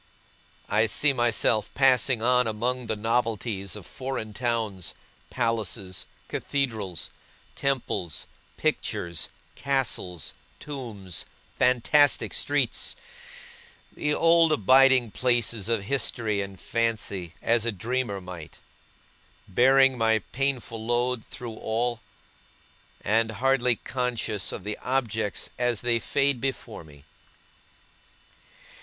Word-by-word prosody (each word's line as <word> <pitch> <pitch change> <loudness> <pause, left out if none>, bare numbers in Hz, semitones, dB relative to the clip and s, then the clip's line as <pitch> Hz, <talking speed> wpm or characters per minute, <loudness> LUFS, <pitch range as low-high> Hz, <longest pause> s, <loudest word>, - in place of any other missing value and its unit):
I 110 +2 +3
see 140 +6 +3
myself 115 -3 +2
passing 130 -3 +4
on 125 0 +4
among 120 +3 -2
the 110 - 0
novelties 110 -3 -1
of 105 -4 -9
foreign 130 -5 -5
towns, 110 -6 -2 0.3
palaces, 110 -6 -1 0.2
cathedrals, 110 - -2 0.4
temples, 130 - -2 0.3
pictures, 85 -2 -2 0.2
castles, 125 - -1 0.3
tombs, 115 - -6 0.3
fantastic 125 +4 +4
streets - - 0 1.0
the 150 - -1
old 165 -1 +5
abiding 130 -1 +5
places 115 -4 +1
of 115 -4 +1
History 110 -3 +1
and 100 -2 -7
Fancy 110 -7 -1
as 115 -1 +2
a 115 - 0
dreamer 110 +1 -2
might; 90 -4 -9 0.9
bearing 130 +5 +4
my 110 0 +4
painful 125 -4 -1
load 120 0 0
through 120 -3 -8
all, 120 +1 -1 1.0
and 110 +2 +2
hardly 125 +1 +2
conscious 120 -6 -2
of - - -6
the 105 +1 -4
objects 115 -5 -1
as 120 -3 +1
they 120 -1 +1
fade 140 0 +1
before 130 -7 -4
me. 75 -3 -16
115 Hz, 100 wpm, -26 LUFS, 105-130 Hz, 1.0 s, old